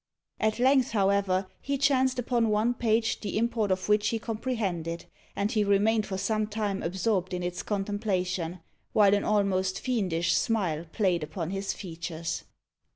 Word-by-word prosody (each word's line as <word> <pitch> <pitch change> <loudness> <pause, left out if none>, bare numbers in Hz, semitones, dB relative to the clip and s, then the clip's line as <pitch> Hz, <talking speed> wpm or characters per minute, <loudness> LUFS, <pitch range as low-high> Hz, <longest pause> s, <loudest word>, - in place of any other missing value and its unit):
At 215 0 +1
length, 260 0 +3
however, 195 -2 +2 0.2
he 280 0 -1
chanced 265 -2 +2
upon 240 -2 +1
one 215 +3 +2
page 225 -1 +1
the 210 - -3
import 230 -2 +1
of 185 0 0
which 210 0 +3
he 230 - 0
comprehended, 215 -8 -3 0.3
and 200 +2 0
he 215 -4 +2
remained 205 +2 +2
for 190 - -3
some 215 +2 0
time 210 -2 -2
absorbed 185 +1 -1
in 180 - -3
its 180 0 -3
contemplation, 190 -4 -2 0.3
while 205 -2 +5
an 205 - +2
almost 190 -3 +1
fiendish 185 -10 0
smile 175 -8 0
played 185 -6 +1
upon 160 +3 -4
his 195 0 -2
features. 165 -2 -5
205 Hz, 155 wpm, -28 LUFS, 185-225 Hz, 0.3 s, while